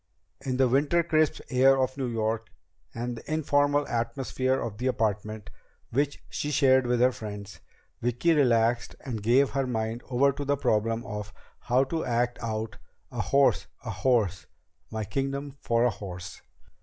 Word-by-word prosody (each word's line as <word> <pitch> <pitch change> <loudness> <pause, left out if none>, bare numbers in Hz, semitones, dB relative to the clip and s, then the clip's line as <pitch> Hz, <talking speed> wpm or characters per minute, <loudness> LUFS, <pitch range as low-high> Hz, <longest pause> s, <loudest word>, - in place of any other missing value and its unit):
In 130 -1 -1
the 130 -1 +4
winter 145 +7 +3
crisp 155 -2 +1
air 135 +1 +5
of 130 0 0
New 135 -2 -2
York, 115 -1 -1 0.4
and 120 +1 -4
the 115 - -9
informal 145 -1 +2
atmosphere 130 +2 -1
of 110 -2 -5
the 125 - -1
apartment 110 -3 -2 0.4
which 140 +3 -1
she 145 - -3
shared 130 -3 +4
with 120 0 +1
her 125 +1 +5
friends, 105 -3 -8 0.4
Vicki 120 +8 +2
relaxed 120 -5 +2
and 120 -6 -5
gave 125 +6 +3
her 135 -1 0
mind 115 -1 -2
over 135 +2 +3
to 140 +1 -5
the 145 0 +1
problem 115 -1 0
of 105 -2 -5 0.3
how 125 +2 +2
to 160 +4 -2
act 120 0 0
out 110 0 -4 0.3
"A 120 -3 -2
horse 135 +8 +3 0.2
a 115 - -3
horse 105 -4 +1 0.4
my 110 0 -3
kingdom 135 +5 -3
for 115 0 +2
a 125 - +3
horse!" 90 -3 -8
125 Hz, 160 wpm, -27 LUFS, 110-135 Hz, 0.4 s, air